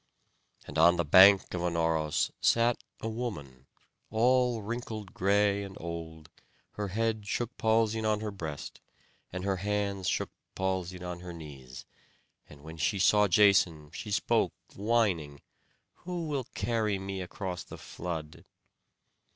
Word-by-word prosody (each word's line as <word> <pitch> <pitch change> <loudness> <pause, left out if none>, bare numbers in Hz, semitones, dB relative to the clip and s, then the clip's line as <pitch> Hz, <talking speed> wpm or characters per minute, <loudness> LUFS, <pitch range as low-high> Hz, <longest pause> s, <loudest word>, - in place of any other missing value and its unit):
And 75 - -4
on 85 +2 +7
the 85 - 0
bank 95 +6 +7
of 90 - -2
Anauros 80 -3 0
sat 120 +1 +3 0.2
a - - -3
woman, 80 - -6 0.4
all 120 0 +2
wrinkled 110 -2 -5
gray, 100 +1 +2
and 100 -1 -8
old; 80 -1 -7 0.4
her 105 -1 -4
head 110 +1 -1
shook 120 +3 -2
palsied 110 -1 +2
on 110 -1 +1
her 110 -1 -3
breast, 80 -7 -7 0.5
and 90 0 -5
her 95 -1 0
hands 100 -1 -1
shook - - -1 0.2
palsied 95 -1 -2
on 90 -1 -5
her 90 0 -8
knees; 70 -6 -10 0.6
and 75 -1 -14
when 80 +1 -9
she 75 +5 0
saw 105 +2 +5
Jason, 90 -6 +4
she 105 - -7
spoke 100 - +1 0.2
whining: 100 -10 0 0.6
"Who 175 -2 -5
will 140 -5 -3
carry 110 -4 0
me 95 0 -5
across 90 0 -5
the - - -10
flood?" 80 -3 -6
95 Hz, 135 wpm, -30 LUFS, 85-110 Hz, 0.6 s, on